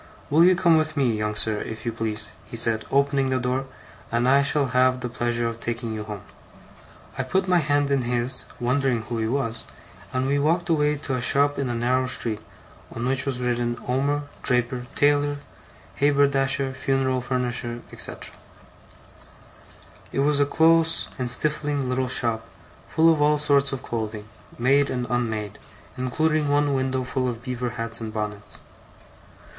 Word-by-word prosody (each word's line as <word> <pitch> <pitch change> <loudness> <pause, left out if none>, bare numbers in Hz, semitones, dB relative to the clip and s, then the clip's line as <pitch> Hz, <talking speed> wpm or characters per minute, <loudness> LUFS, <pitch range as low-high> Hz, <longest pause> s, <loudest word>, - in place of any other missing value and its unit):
'Will 160 +3 +6
you 185 +1 +6
come 175 -3 +4
with 155 -1 -1
me, 125 -5 +2
young 105 0 -2
sir, 110 -1 +1
if 110 +1 -7
you 115 - 0
please,' 110 -1 -4 0.2
he 115 - -6
said, 115 -1 +5
opening 140 -1 +2
the 130 - +1
door, 130 +1 -1 0.4
'and 120 +1 +1
I 135 +2 +5
shall 140 +1 +2
have 130 0 +3
the 125 - -3
pleasure 120 0 -1
of 115 0 -5
taking 115 -1 -3
you 110 -1 -4
home.' 105 -3 -7 1.0
I - - +3
put 185 +9 0
my 180 -1 +4
hand 145 -2 +1
in 140 -1 +2
his, 120 +1 -2
wondering 125 -1 +1
who 115 +1 -4
he 110 - 0
was, 115 -2 -2 0.5
and 130 0 -1
we 140 +1 +1
walked 170 +4 +1
away 150 -2 +2
to 140 -2 -4
a 130 - -1
shop 140 +3 +2
in 135 -2 -1
a 120 - -2
narrow 125 +2 +1
street, 110 -4 -1 0.5
on 115 +1 -4
which 135 +1 +2
was 130 -2 0
written 120 -1 -1
OMER, 140 +3 0 0.2
DRAPER, 125 0 0
TAILOR, 145 0 +2 0.6
HABERDASHER, 140 -1 +2
FUNERAL 130 -1 0
FURNISHER, 120 -1 -2
&c. - - -5 2.0
It - - -2
was 145 0 +2
a 145 - +3
close 165 +1 +3
and 125 -1 -1
stifling 145 +1 0
little 130 0 0
shop; 115 -3 -1 0.4
full 165 +1 +4
of 150 - -2
all 150 0 +4
sorts 140 -1 +3
of 135 - -5
clothing, 110 -2 -4 0.3
made 140 +4 +3
and 125 -1 -2
unmade, 110 -4 -2 0.4
including 150 +4 0
one 145 0 +2
window 130 -1 0
full 130 0 -2
of 120 -1 -6
beaver 125 -1 -3
hats 115 0 +1
and 110 -1 -4
bonnets. 105 -1 -5
130 Hz, 170 wpm, -24 LUFS, 120-145 Hz, 2.0 s, Will